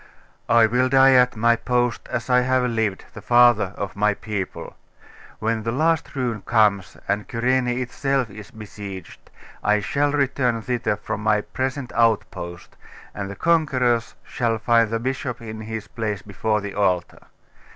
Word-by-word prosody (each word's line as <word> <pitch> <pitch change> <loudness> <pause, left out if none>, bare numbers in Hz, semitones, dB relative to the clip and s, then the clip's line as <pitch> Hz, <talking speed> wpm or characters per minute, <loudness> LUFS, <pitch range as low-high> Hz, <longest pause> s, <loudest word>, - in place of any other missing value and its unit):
'I 115 -1 +6
will 125 +3 +1
die 135 0 +6
at 125 -1 +4
my 115 +2 +3
post 120 0 -1
as 120 -3 -3
I 125 -1 +4
have 130 0 +1
lived, 110 -5 -1
the - - -9
father 120 -5 +4
of 100 -2 -5
my 105 +1 +2
people. 105 -4 -5 0.6
When 115 0 -1
the 115 +1 -2
last 160 +4 0
ruin 120 -5 -2
comes, 105 -5 +1
and 105 +1 -1
Cyrene 125 +2 +1
itself 125 0 -1
is 105 0 -11
besieged, 100 -4 -10 0.3
I 105 0 +3
shall 145 +7 0
return 130 -5 0
thither 120 -3 -1
from 105 +1 -5
my 105 -1 +2
present 130 +2 -4
outpost, 100 -6 -1 0.4
and 100 -1 -5
the 100 - -7
conquerors 130 -8 +1
shall 115 -2 -1
find 115 0 +3
the 115 - -1
bishop 130 0 -3
in 110 -1 -8
his 110 -1 -6
place 110 -4 -4
before 105 +2 -1
the 100 -1 -6
altar. 90 -4 -1
115 Hz, 155 wpm, -22 LUFS, 105-125 Hz, 0.6 s, I